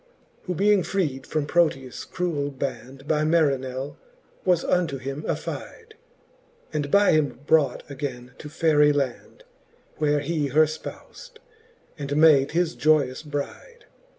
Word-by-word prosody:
Who 180 - -3
being 205 +2 +4
freed 155 -9 -2
from 155 -2 -1
Proteus 145 -6 0
cruell 165 -6 -2
band 135 +1 -6
By 155 -1 +1
Marinelf 140 -4 0 0.5
was 180 -3 +2
unto 170 -6 +1
him 135 +3 -5
affide, 445 -1 -5 0.8
And 145 -2 -2
by 200 +5 +5
him 145 -5 +1
brought 145 -5 +2
againe 130 -3 -6
to 150 - -8
Faerie 150 -2 +3
land; 135 -4 -3 0.5
Where 150 -1 +1
he 150 0 -1
her 150 +4 +4
fpous'd, 450 - -9 0.6
and 140 0 -3
made 150 -3 +6
his 170 0 +1
joyous 150 -4 +2
bride. 150 - -7
150 Hz, 125 wpm, -24 LUFS, 135-165 Hz, 0.8 s, made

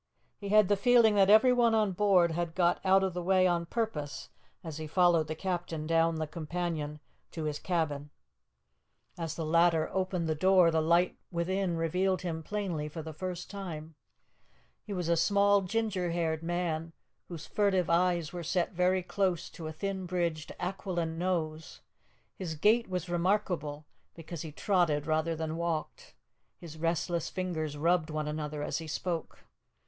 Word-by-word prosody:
He 200 - -6
had 210 -1 +5
the 205 - +3
feeling 235 +1 +5
that 195 -1 +4
everyone 235 +1 +5
on 215 -3 +2
board 185 -3 +3
had 170 0 -3
got 175 -1 +2
out 195 0 +4
of 190 -2 -1
the 180 - -3
way 185 +1 +3
on 170 -2 +1
purpose 170 -11 -3 0.3
as 160 -3 -6
he 155 - -5
followed 170 -1 +3
the 155 - -4
captain 175 -3 -3
down 165 0 +2
the 160 0 -2
companion 155 -1 -4 0.3
to 160 - -6
his 150 -1 -2
cabin. 150 -5 -2 1.1
As 165 -3 -4
the 165 - -3
latter 165 0 +3
opened 185 -3 -1
the 160 - +1
door 180 +1 +4
the 160 0 +2
light 170 +3 +2
within 180 +1 -1
revealed 185 +4 0
him 165 -2 -3
plainly 170 -4 -3
for 160 +1 -7
the 160 0 -7
first 180 +2 -5
time. 165 -6 -7 0.9
He - - -6
was 180 -4 -2
a 170 - +3
small 200 +3 +4
ginger 195 -2 -1
haired 165 -2 -1
man, 165 -1 -2 0.3
whose 165 -3 -8
furtive 190 -3 +1
eyes 175 -1 +1
were 175 - -4
set 175 +3 -1
very 180 +1 +2
close 185 -3 -1
to 160 - -7
a - - -4
thin 190 +3 -4
bridged, 170 -3 -2
aquiline 175 -3 -3
nose; 160 -3 -2 0.5
his 170 -4 -5
gait 220 +9 +3
was 180 -2 -3
remarkable 175 -4 -1 0.3
because 165 -1 -7
he 160 - -6
trotted 165 -4 +1
rather 160 +1 0
than 160 0 -3
walked; 165 - -4 0.4
his 165 -2 -10
restless 170 0 -1
fingers 160 -5 -3
rubbed 170 +1 +2
one 155 -1 -3
another 150 -1 -4
as 150 - -2
he 165 - -7
spoke. 165 +2 -4
170 Hz, 165 wpm, -30 LUFS, 160-185 Hz, 1.1 s, had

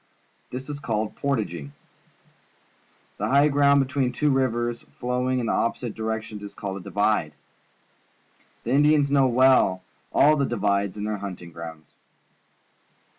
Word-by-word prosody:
This 130 +1 -6
is 145 -1 -5
called 110 -6 -2
portaging. 85 - -3 1.5
The - - -1
high 140 +2 +4
ground 140 -1 +4
between 130 -1 -1
two 145 +4 +1
rivers 120 -3 0 0.2
flowing 125 +1 0
in 120 -2 -1
opposite 115 0 -1
directions 110 -1 -4
is 100 - -9
called 100 -1 -5
a - - -6
divide. 100 -6 0 1.3
The - - -3
Indians 145 0 +4
know 135 -2 +4
well 125 -7 +4 0.3
all 150 +2 +5
the 140 - +1
divides 100 -1 0
in 105 - -4
their 105 0 -2
hunting 90 -4 -7
grounds. 80 -1 -10
120 Hz, 130 wpm, -25 LUFS, 100-140 Hz, 1.5 s, all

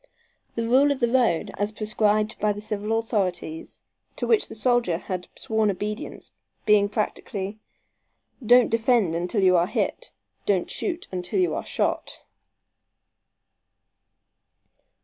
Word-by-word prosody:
The 230 -1 -1
rule 270 +4 +5
of 280 - -1
the 240 -2 +1
road, 235 -10 +2
as 205 +1 0
prescribed 215 0 0
by 210 -1 +2
the 205 - -7
civil 210 +1 -1
authorities, 185 -8 -3 0.3
to - - -2
which 445 -3 +3
the - - -8
soldier 235 -6 +2
had 180 0 -5
sworn 220 -1 0
obedience, 210 +3 -4 0.3
being 210 -1 +4
practically, 210 -1 -3 0.8
"Don't 245 +2 +5
defend 225 -5 +2
until 180 +5 0
you 185 -1 +5
are 175 0 +3
hit. - - -2 0.4
Don't 190 -4 +1
shoot 350 -2 -3
until 180 - -2
you 360 - +2
are - - -3
shot." - - -2
215 Hz, 130 wpm, -25 LUFS, 190-230 Hz, 0.8 s, rule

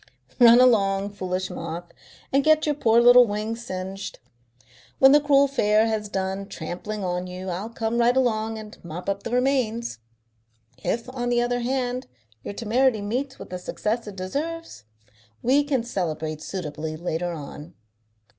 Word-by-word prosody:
"Run 240 0 +8
along, 200 -5 +3
foolish 185 -1 -3
moth, 170 +1 -6 0.4
and 275 +1 +4
get 310 +1 +4
your 300 - +2
poor 235 -5 +3
little 245 0 +8
wings 215 +3 -3
singed. 190 -1 -6 0.8
When 270 0 +7
the 295 - +7
cruel 280 -1 +4
fair 215 -5 +3
has 215 -2 -2
done 190 0 -3
trampling 200 +4 -5
on 180 0 -2
you 185 +1 -6
I'll 185 +5 -4
come 230 0 -2
right 240 +2 +3
along 225 -3 +1
and 215 -1 -11
mop 170 +1 -7
up 200 0 -1
the - - -5
remains. 240 - 0 0.8
If, 230 +1 -1
on 245 -2 -2
the 240 0 +2
other 245 0 0
hand, 250 0 -2 0.4
your 200 - -6
temerity 235 +1 +2
meets 260 +6 -3
with - - -11
the 180 - -4
success 220 +5 -3
it 205 - -7
deserves, 285 - -5 0.6
we 275 +4 +4
can 275 -5 0
celebrate 160 -8 -3
suitably 155 -3 -5
later 175 +1 -2
on." 150 +1 -9
220 Hz, 155 wpm, -24 LUFS, 185-245 Hz, 0.8 s, Run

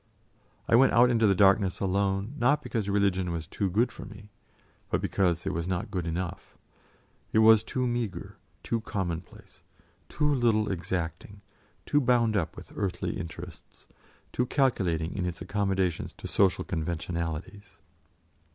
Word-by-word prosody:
I - - 0
went 135 +3 +5
out 120 +1 +6
into 115 -2 +3
the 100 - +4
darkness 95 0 +4
alone, 100 +3 0
not 140 +5 +3
because 110 -4 -2
religion 95 -3 +1
was 85 -2 -3
too 95 +4 -2
good 115 +6 +1
for - - -9
me, 105 0 -12 0.6
but - - +1
because 90 -3 0
it 95 - -1
was 85 0 -3
not 90 -1 -2
good 90 -3 -2
enough; 85 +1 -5 0.7
it - - +1
was 110 0 +7
too 125 +3 -2
meagre, 120 -5 -3 0.3
too 115 -1 -1
commonplace, 90 -6 -5 0.5
too 150 0 +1
little 110 -5 +2
exacting, 90 +2 -4 0.4
too 145 - +2
bound 120 -3 +3
up 85 -5 -1
with - - -11
earthly 100 -3 -2
interests, 85 - -10 0.5
too 125 - 0
calculating 90 - 0
in 90 -2 -1
its 85 -2 -5
accommodations 95 -2 -1
to - - -13
social 95 -2 +2
conventionalities. 85 +3 -4
100 Hz, 145 wpm, -28 LUFS, 90-110 Hz, 0.7 s, was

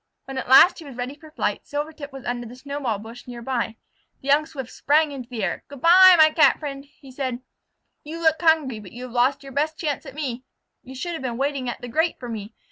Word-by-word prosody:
When 270 -1 -5
at 255 - -7
last 300 +9 +7
he - - -9
was 275 -3 -10
ready 250 +2 -4
for 310 +2 -15
flight, 310 - -2
Silvertip 295 0 -5
was 270 -1 -10
under 240 -1 -3
the 240 - -11
snowball 275 -4 -3
bush 225 +5 -11
near 240 -1 -8
by. 235 -3 -2 0.5
The 275 - -5
young 300 +2 +4
Swift 265 -6 -7
sprang 300 +1 +2
into 255 -3 -8
the 230 -5 -4
air. 185 - -2
"Good 285 -2 -11
by, 370 +2 +8
my 310 -1 +7
Cat 310 0 +5
friend," 280 -2 -6 0.2
said 255 -2 -3 0.6
he. 295 - -13
"You 330 +1 -5
look 320 0 +3
hungry, 315 -8 +3
but 200 -4 -12
you 245 +2 -8
have 255 - -8
lost 255 +4 +1
your 275 - -10
best 305 +4 -1
chance 300 -2 -3
at 270 - -10
me. 260 -5 -4 0.4
You 260 +1 -11
should 345 +6 -4
have 325 - -5
been 245 -3 -3
waiting 275 -2 -1
at - - -6
the 245 - -6
grate 320 +8 0
for 245 - -7
me. 220 -1 -7
270 Hz, 245 wpm, -23 LUFS, 245-305 Hz, 0.6 s, by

